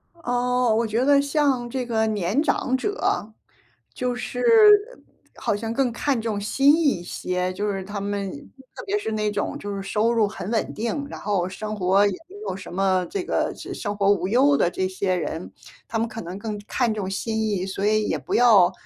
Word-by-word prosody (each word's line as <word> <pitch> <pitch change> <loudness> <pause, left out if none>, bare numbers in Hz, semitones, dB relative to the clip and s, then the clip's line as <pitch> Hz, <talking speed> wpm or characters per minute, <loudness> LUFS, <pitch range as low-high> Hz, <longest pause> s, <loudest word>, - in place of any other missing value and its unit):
哦， 250 -5 +1
我 230 +1 +1
觉 225 +3 0
得 280 0 +5
像 280 -4 +1
这 255 0 -3
个 220 -2 +1
年 210 +4 0
长 260 - +1
者， 260 - -1 0.6
就 250 -1 -1
是 245 0 -5 1.0
好 205 - -1
像 225 +1 -4
更 255 0 +1
看 260 +1 0
重 220 -2 -2
心 275 +8 +4
意 335 - 0 0.2
一 175 - -9
些。 180 +1 -2
就 205 +3 -2
是 195 -1 -4
他 205 +1 -5
们 200 -1 -3 0.4
特 - - -8
别 410 +1 0
是 220 - -4
那 210 -1 0
种 205 0 -2
就 205 0 -5
是 195 - -4
收 215 +4 +1
入 225 -2 +3
很 200 -1 -6
稳 225 -2 -1
定， 235 +6 -3
然 - - -8
后 195 -3 0
生 215 +3 -5
活 195 +1 +3
也 200 - +1 0.2
没 400 - -13
有 - - -3
什 185 -3 -10
么 190 -1 +1
这 395 - -2
个 - - 0
这 - - -8
生 205 -2 -4
活 200 -1 +3
无 190 -2 -1
忧 270 +6 +4
的 175 - +2
这 185 +1 -1
些 185 0 -1
人， 170 -1 -4 0.4
他 225 - -2
们 230 - +1
可 220 +1 -7
能 180 +1 -7
更 210 -1 -5
看 240 -1 0
重 205 -3 -3
心 220 +3 -2
意， 205 -4 -1
所 195 +1 -2
以 215 0 +2
也 - - 0
不 - - -5
要 215 -7 +6
215 Hz, 225 characters per minute, -24 LUFS, 195-245 Hz, 1.0 s, 要